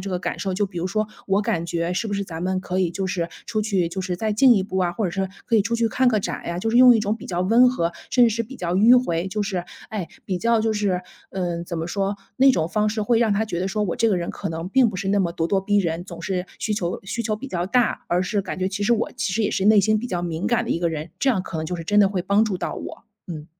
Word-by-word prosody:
这 195 - -5
个 180 - -1
感 - - -4
受， 195 - -2
就 205 +2 +1
比 185 -3 -7
如 175 - -1
说：” 215 +3 -1 0.2
我 195 +1 +2
感 170 -4 -1
觉 170 0 -1
是 205 +5 -1
不 205 - -4
是 200 - -1
咱 165 -2 -7
们 185 0 0
可 185 0 -3
以， 180 -3 +1
就 190 +2 -3
是， 175 -2 -2 0.2
出 215 -2 -1
去， 195 -5 0
就 175 +3 -4
是 185 -1 -2
再 215 +3 -1
进 245 +3 +6
一 195 - +2
步 190 -1 -5
啊， 180 -2 +1
或 210 +5 -2
者 180 - 0
说 195 +1 -1 0.2
可 230 - +3
以 210 - +4
出 235 +4 -2
去 230 -1 +1
看 255 +4 +1
个 220 - +2
展 - - -3
啊？” 170 +1 -4
就 225 +4 -1
是 235 - +2
用 250 0 +8
一 - - 0
种 210 +1 -1
比 225 - -10
较 175 -1 -2
温 230 +7 +5
和、 170 -8 -1 0.2
甚 245 -2 +5
至 225 - +1
是 230 - -1
比 255 +4 -10
较 175 -3 -2
迂 240 +6 +6
回， 170 -5 -1
就 210 +2 -2
是 190 -4 -3 0.2
哎， 205 -6 -4 0.2
比 185 -2 -2
较 230 +2 +2
就 220 0 +1
是 200 -4 0 0.3
嗯， 175 -2 -3
怎 170 -1 -5
么 160 - -3
说， 195 +2 -1 0.2
那 270 +1 +6
种 165 -10 0
方 210 +3 +1
式 215 0 -2
会 230 +2 +2
让 225 -3 +3
他 210 +2 +1
觉 175 -6 -4
得 185 - -1
说， 210 +2 -1
我 180 -5 -2
这 230 - +3
个 195 - +2
人 170 -1 -3
可 200 - -5
能 165 +2 -4
并 250 +4 +4
不 205 - -5
是 195 +1 -3
那 200 - +2
么 170 -2 0
咄 165 -1 -1
咄 195 -1 +2
逼 205 +1 +1
人， 170 -2 -1
总 170 -3 -9
是， 185 -1 -2
需 215 - -1
求 175 -4 -3
需 230 +4 -3
求 215 -1 -1
比 275 +5 -8
较 175 -5 -2
大， 245 +3 +1
而 175 +1 +2
是 200 +1 -1
感 185 - -5
觉 185 - 0
其 200 +1 -4
实 235 - +3
我 230 -1 0
其 240 -6 -1
实 225 - 0
也 210 - +1
是 190 - -1
内 210 0 +6
心 215 +2 +2
比 245 - -4
较 180 -7 -2
敏 165 0 -3
感 240 - +1
的 - - -5
一 - - +1
个 170 0 +1
人。 160 0 -5
这 275 - +2
样 195 -7 0
可 170 - -6
能 155 - -3
就 180 - -3
是 165 - -7
真 205 +3 +2
的 195 - +5
会 190 -2 -2
帮 200 +3 +3
助 205 -4 -2
到 - - -3
我。 - - -8 0.2
嗯。 155 -3 -6
195 Hz, 345 characters per minute, -23 LUFS, 175-215 Hz, 0.3 s, 用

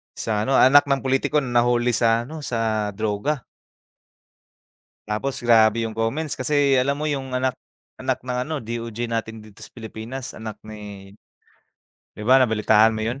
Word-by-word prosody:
sa 105 -1 -2
ano, 135 - +1
anak 140 +3 +6
ng 140 -1 +1
pulitiko, 135 +3 +1
na 120 -2 +1
nahuli 120 0 +2
sa 115 0 +2
ano, 155 +6 -8
sa 110 -6 -1
droga. 110 +6 -2 1.6
Tapos 110 +6 -3
grabe 115 -1 +4
yung 110 - -8
comments 135 +8 -2
kasi 140 +1 +2
alam 140 +3 +1
mo 155 - -1
yung 135 -3 -3
anak 125 0 0 0.4
anak 130 0 -2
ng 125 0 -2
ano, 155 +2 -4
DOJ 115 0 -5
natin 115 -1 -4
dito 105 -1 -14
sa - - -12
Pilipinas, 115 +3 -8
anak 110 -1 -8
ni 100 -2 -10 1.0
‘di 105 - -7
ba 130 +3 +6
nabalitaan 110 -2 +3
mo 110 - -2
yun? 120 +4 -3
120 Hz, 160 wpm, -23 LUFS, 110-135 Hz, 1.6 s, anak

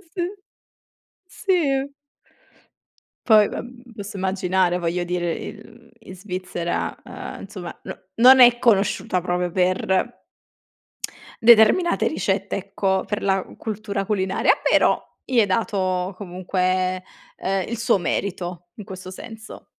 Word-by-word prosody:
sì. 350 +1 -3 1.0
Sì. 320 -10 0 1.3
Poi 215 -3 +7
vabb 245 0 -8
posso 205 -1 -7
immaginare, 185 -1 +1
voglio 175 +1 -1
dire, 175 -1 -1
in 230 +2 -11
in 185 - -10
Svizzera, 180 -2 -3
ehm, - - -8
insomma 190 -3 -7
no - - -6 0.2
non 255 +3 +8
è 240 -1 +8
conosciuta 205 -5 +2
proprio 180 0 -1
per 185 +5 0 1.2
determinate 235 +10 +6
ricette, 195 -9 -1
ecco, 195 -1 -1
per 210 0 -3
la 195 -1 +1
cultura 205 -2 -4
culinaria, 190 -2 +2
però - - +3 0.2
gli 250 -3 +2
è 210 - +3
dato 185 -2 -1
comunque, 185 0 -1 0.3
ehm, 190 -1 -1
il 235 - -3
suo 235 -3 +3
merito 175 -1 -3
in 210 - -8
questo 185 -1 -9
senso. 220 +3 -10
195 Hz, 115 wpm, -22 LUFS, 185-225 Hz, 1.3 s, non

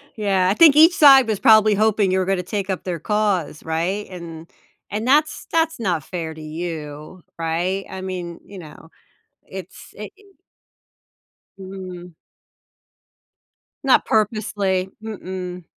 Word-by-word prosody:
yeah, 195 -4 +1
I - - +3
think 305 +2 +6
each 325 +3 +7
side 270 -5 +7
was 215 -3 -1
probably 215 -3 +5
hoping 210 -2 +2
you 190 - +1
were 185 - 0
gonna 190 -1 -1
take 200 +1 -4
up 190 - -3
their 175 -3 -4
cause, 205 -7 -1
right? 170 +6 -2
And 165 -2 -9 0.4
and 215 +4 -3
that's 305 +3 +2
that's 325 -3 0
not 175 -9 -1
fair 165 -2 -6
to 160 - -12
you, 155 +1 -7
right? 175 +4 -2
I 190 0 -7
mean, 180 -2 -6
you 195 -2 -11
know, 160 0 -13 0.6
it's 190 -2 -11
i 210 - -6
i - - -20 1.4
Mm. 185 -2 -9 1.7
Not 270 - +3
purposely. 200 -3 -1
Mm-mm. 185 -4 -7
190 Hz, 135 wpm, -21 LUFS, 175-215 Hz, 1.7 s, each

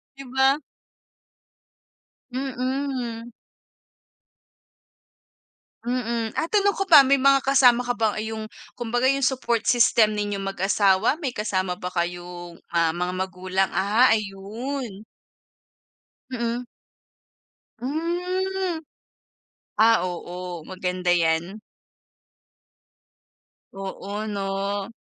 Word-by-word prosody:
'Di 275 - -9
ba? 270 +3 +3 1.7
Mm. 255 -3 -3 2.5
Mm. 235 -2 -2
Ah, 330 - -2
tanong 405 -1 +3
ko 390 -1 -3
pa, 295 -5 +9
may 275 0 +3
mga 275 0 +4
kasama 250 -3 +5
ka 245 - 0
ba 220 -1 +1
yung 220 0 -5 0.2
kumbaga, 240 +1 -2
yung 275 0 0
support 240 -3 0
system 225 -3 +4
ninyong 205 -1 -2
mag-asawa, 195 - +2
may 265 -5 -3
kasama 185 -4 -1
ba 180 0 -6
kayong, 175 0 -4 0.2
ah, 165 -1 +2
mga 180 +1 -1
magulang? 185 +1 -1
Ah, 215 +7 +4
ayun. 215 +2 -3 1.3
Mm. 235 0 -2 1.1
Hmm. 355 +5 -2 1.0
Ah, 225 +1 +5
oo. 175 -1 -7
Maganda 180 -1 -3
'yan. 170 +4 0 2.1
Oo 200 +2 -5
'no. 200 0 -2
220 Hz, 90 wpm, -24 LUFS, 190-260 Hz, 2.5 s, pa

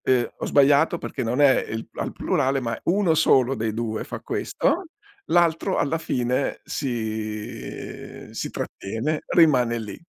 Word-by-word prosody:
Eh 125 -2 +2
ho - - -5
sbagliato 145 +4 +4
perché 140 - -5
non 120 +4 0
è 140 -2 +5
i 110 +1 -4
al - - -3
plurale, 140 -6 0
ma 115 -3 -3
1 185 -2 +3
solo 135 -5 +4
dei 110 -3 -2
2 110 0 -3
fa - - -6
questo, 365 +3 -1 0.4
l'altro 175 +2 +2
alla 160 +3 0
fine 125 -2 -1
si, 110 -5 -5
si - - -3
trattiene, 120 +10 -3
rimane 130 -9 +4
lì 110 -2 -7
130 Hz, 140 wpm, -24 LUFS, 115-155 Hz, 0.4 s, è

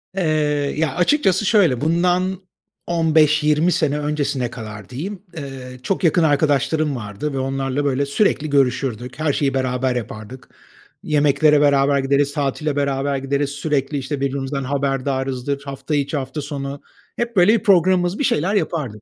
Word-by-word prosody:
Eee, 190 - 0 0.5
ya, 155 -4 0
açıkçası 190 - +2
şöyle, 180 - +3
bundan 180 +3 +1 0.5
15-20 155 -1 +3
sene 150 -2 0
öncesine 145 -4 -1
kadar 110 -1 -9
diyeyim, 180 +10 -6 0.2
eee, 130 -3 -8
çok 190 +3 -2
yakın 170 0 +3
arkadaşlarım 145 0 +1
vardı 110 +6 -5
ve 135 - -2
onlarla 135 +1 -2
böyle 140 0 +1
sürekli 155 0 +1
görüşürdük, 125 -2 0
her 155 -3 +1
şeyi 140 -2 0
beraber 130 -1 0
yapardık. 115 +1 -7 0.5
Yemeklere 150 0 +3
beraber 140 -1 +3
gideriz, 140 +1 +1
tatile 145 +1 -1
beraber 140 0 0
gideriz, 140 +1 -1
sürekli, 145 -1 -2
işte, 135 +1 -4
birbirimizden 135 0 -2
haberdarızdır 135 0 -2
hafta 140 +2 -4
içi, 145 +1 -1
hafta 135 +3 -4
sonu. 140 -1 -5 0.3
Hep 235 -1 -3
böyle 185 +4 +5
bir - - -20
programımız, 185 - +3
bir - - 0
şeyler 190 - +1
yapardık. 135 - -2
140 Hz, 140 wpm, -20 LUFS, 135-155 Hz, 0.5 s, böyle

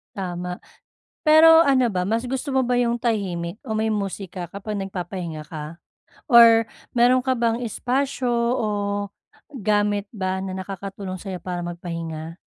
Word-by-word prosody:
Tama, 180 -2 -4 0.7
pero 320 +1 +8
ano 260 -3 +3
ba, 180 -3 -1
mas 225 +4 0
gusto 265 +2 -3
mo 265 - +3
ba 245 -1 +1
yung 240 -1 +1
tahimik 190 -6 -2
o 220 - -3
may 220 0 0
musika 195 -3 -3
kapag 200 +4 -6
nagpapahinga 180 -4 -5
ka? 155 +1 -8 0.4
Or 230 -3 +7 0.3
meron 245 +2 +5
ka 260 0 0
bang 235 0 0
espasyo 255 +2 -1 0.2
o 220 - -1 0.9
gamit 205 0 +1
ba 190 -3 -3
na 190 0 -4
nakakatulong 190 0 -6
sa'yo 190 -1 -5
para 180 -1 -3
magpahinga? 165 -2 -6
200 Hz, 140 wpm, -23 LUFS, 180-240 Hz, 0.9 s, pero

